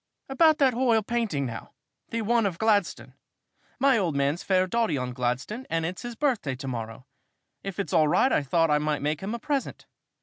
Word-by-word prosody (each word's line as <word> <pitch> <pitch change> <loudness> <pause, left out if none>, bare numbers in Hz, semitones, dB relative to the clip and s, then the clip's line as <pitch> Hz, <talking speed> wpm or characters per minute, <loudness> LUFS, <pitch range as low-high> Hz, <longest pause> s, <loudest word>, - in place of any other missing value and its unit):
"About 310 +3 +4
that 270 -4 +3
h'oil 230 -3 +2
painting, 220 -13 -1
now 115 -3 -7 0.4
the 230 -1 -2
one 230 0 +2
of 175 -4 -4
Gladstone. 210 -3 0 0.6
My 270 -3 +3
old 170 -7 -1
man's 140 +4 0
fair 185 -1 +2
dotty 225 -3 0
on 125 -1 -3
Gladstone 125 - -3
and 165 0 -1
it's 175 +1 -5
his 240 -1 -6
birthday 230 - 0
to 135 +2 -8
morrow. 115 0 -6 0.6
If 195 -2 -6
it's 195 -7 -3
all 160 -3 +4
right, 260 - +3
I - - +3
thought 165 +3 +1
I 150 - +3
might 150 -1 -1
make 150 +1 -1
him 205 +4 -3
a - - -6
present. 285 0 -3
185 Hz, 200 wpm, -26 LUFS, 145-235 Hz, 0.6 s, About